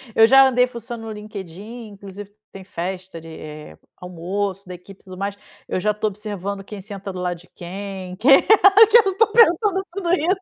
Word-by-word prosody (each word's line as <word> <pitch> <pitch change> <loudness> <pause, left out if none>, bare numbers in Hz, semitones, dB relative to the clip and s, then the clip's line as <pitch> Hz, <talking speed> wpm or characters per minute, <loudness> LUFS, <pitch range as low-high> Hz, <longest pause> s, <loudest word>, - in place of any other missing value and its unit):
Eu 225 - +7
já 270 +2 +7
andei 250 -1 +2
fuçando 235 -1 -8
no 220 - -6
LinkedIn, 210 +2 -9
inclusive 200 0 -11 0.2
tem 195 - -11
festa 185 -1 -6
de, 165 - -14
eh, 150 - -10 0.2
almoço 185 +2 -5
da 180 - -7
equipe 185 +2 -15
e - - -42
tudo 185 -1 -11
mais. 200 +1 -4 0.3
Eu - - -2
já 210 +3 +1
estou 210 +1 -2
observando 200 -1 -6
quem 200 0 -9
senta 200 -1 -8
do 185 - -7
lado 180 -1 -3
de 180 - -19
quem, 185 0 -7
que 230 - -3
eu 405 +7 +6
estou 430 +2 +2
pensando 400 -3 +3
tudo 355 -3 -1
isso. 360 +2 +1
200 Hz, 190 wpm, -21 LUFS, 185-250 Hz, 0.3 s, Eu